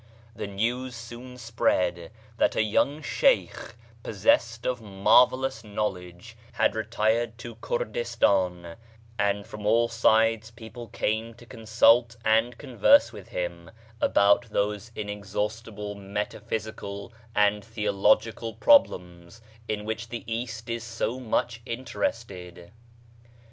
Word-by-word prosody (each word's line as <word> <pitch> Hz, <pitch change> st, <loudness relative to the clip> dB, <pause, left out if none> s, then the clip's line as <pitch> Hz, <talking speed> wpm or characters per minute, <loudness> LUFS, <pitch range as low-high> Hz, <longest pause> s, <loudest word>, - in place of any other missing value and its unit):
The -, -, -5 dB
news 120 Hz, +5 st, -2 dB
soon 120 Hz, +2 st, -10 dB
spread 90 Hz, -7 st, 0 dB, 0.3 s
that -, -, +2 dB
a -, -, +3 dB
young 140 Hz, +8 st, +1 dB
Shaikh, -, -, +1 dB, 0.3 s
possessed 115 Hz, -, +1 dB
of 125 Hz, -2 st, -1 dB
marvellous 125 Hz, +6 st, +3 dB
knowledge, 100 Hz, -1 st, -5 dB, 0.2 s
had -, -, +2 dB
retired 110 Hz, +1 st, 0 dB
to 120 Hz, 0 st, -8 dB
Kurdistan, 95 Hz, -, -1 dB, 0.4 s
and 100 Hz, 0 st, 0 dB
from 105 Hz, -1 st, -9 dB
all 115 Hz, +2 st, +4 dB
sides 115 Hz, -1 st, +2 dB
people 115 Hz, +1 st, -10 dB
came 110 Hz, +1 st, -2 dB
to 120 Hz, -, -15 dB
consult 115 Hz, +1 st, +3 dB
and 115 Hz, +2 st, +2 dB
converse 145 Hz, -, +4 dB
with'him -, -, -6 dB, 0.3 s
about 115 Hz, -, +3 dB
those 105 Hz, +1 st, -1 dB
inexhaust 105 Hz, +1 st, -4 dB
ible 105 Hz, 0 st, -6 dB
metaphysical 100 Hz, +1 st, -5 dB, 0.2 s
and 105 Hz, 0 st, +3 dB
theological 110 Hz, +1 st, +1 dB
pro 285 Hz, -, +8 dB
blems 90 Hz, -, -12 dB, 0.3 s
in 105 Hz, -1 st, -3 dB
which 110 Hz, +1 st, -4 dB
the 120 Hz, -1 st, -6 dB
East 115 Hz, 0 st, -5 dB
is 115 Hz, -1 st, -3 dB
so 115 Hz, +2 st, -3 dB
much 120 Hz, -1 st, -1 dB
in 115 Hz, +3 st, -6 dB
terested. 100 Hz, -6 st, -5 dB
110 Hz, 115 wpm, -26 LUFS, 105-120 Hz, 0.4 s, pro